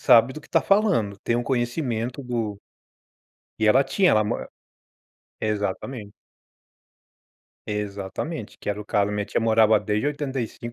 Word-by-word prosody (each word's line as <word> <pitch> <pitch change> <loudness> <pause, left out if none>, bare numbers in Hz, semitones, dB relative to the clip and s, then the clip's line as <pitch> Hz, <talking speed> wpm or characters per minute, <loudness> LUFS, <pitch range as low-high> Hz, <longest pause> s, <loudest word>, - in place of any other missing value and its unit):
sabe 115 +2 +6
do 155 - -7
que - - -19
está 165 - +3
falando, 190 - +2
tem 115 - +1
um 120 - 0
conhecimento 120 0 -2
do 115 -5 -3 1.0
E 110 - +2
ela 130 +5 +5
tinha, 185 +7 +3
ela 110 -1 +4
mo - - -1 1.0
Exatamente. 105 +1 -3 1.5
Exatamente, 105 - -4
que - - -7
era 105 0 -1
o 105 - -6
caso, 100 -1 +1
a - - -3
minha 105 0 -1
tia - - -1
morava 110 -1 +4
desde 105 +5 -1
85. 135 -5 -3
115 Hz, 145 wpm, -24 LUFS, 105-130 Hz, 1.5 s, sabe